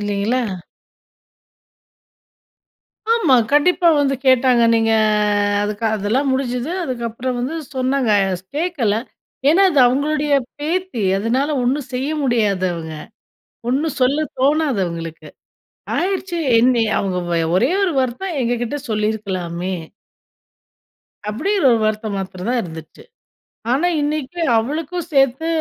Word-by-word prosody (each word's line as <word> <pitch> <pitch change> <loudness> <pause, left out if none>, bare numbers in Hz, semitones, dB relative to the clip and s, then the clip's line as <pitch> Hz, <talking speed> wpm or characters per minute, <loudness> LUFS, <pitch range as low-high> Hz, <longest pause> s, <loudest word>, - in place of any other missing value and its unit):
இல்லீங்களா? 205 +5 0 2.7
ஆமா! 340 - +3 0.2
கண்டிப்பா 345 +4 +4
வந்து 275 -1 +1
கேட்டாங்க. 255 -2 +4
நீங்க 225 0 +2 0.7
அதுக்கு 210 +2 -3
அதெல்லாம் 220 +7 0
முடிஞ்சுது. 255 +1 -2
அதுக்கப்புறம் 245 0 -3
வந்து 260 +6 -3 0.2
சொன்னாங்க. 260 -2 0 0.5
கேக்கல, 295 - 0 0.5
ஏன்னா 360 +6 +5
அது 300 - +1
அவுங்களுடைய 295 +3 0 0.3
பேத்தி. 340 - -2 0.2
அதுனால 250 +8 0
ஒண்ணும் 260 +2 -1
செய்ய 260 +3 -2
முடியாது 210 -7 +1
அவுங்க. 160 -1 -6 0.8
ஒண்ணும் 285 +3 -1
சொல்ல 285 +5 +2
தோணாது 285 -4 +2
அவுங்களுக்கு. 165 -1 -7 0.7
ஆயிடுச்சு 370 -1 -1 0.2
என்னி 240 0 +3 0.2
அவுங்க 190 -2 -1
வய 165 -1 +1
ஒரே 250 - +2
ஒரு 375 -3 +1
வருத்தம் 280 +7 -3
எங்க 240 0 0
கிட்ட 240 +5 -2
சொல்லிருக்கலாமே! 190 -4 -2 1.5
அப்படி 215 - -2 0.2
ஒரு 235 -2 +4
வருத்தம் 215 -1 -1
மாத்திரந்தான் 195 +5 -2
இருந்துச்சு. 160 - -10 0.7
ஆனா 300 +7 +2
இன்னிக்கு 300 +3 -3 0.2
அவளுக்கும் 315 +8 -3
சேத்து 270 +3 +2
255 Hz, 105 wpm, -19 LUFS, 215-295 Hz, 2.7 s, ஏன்னா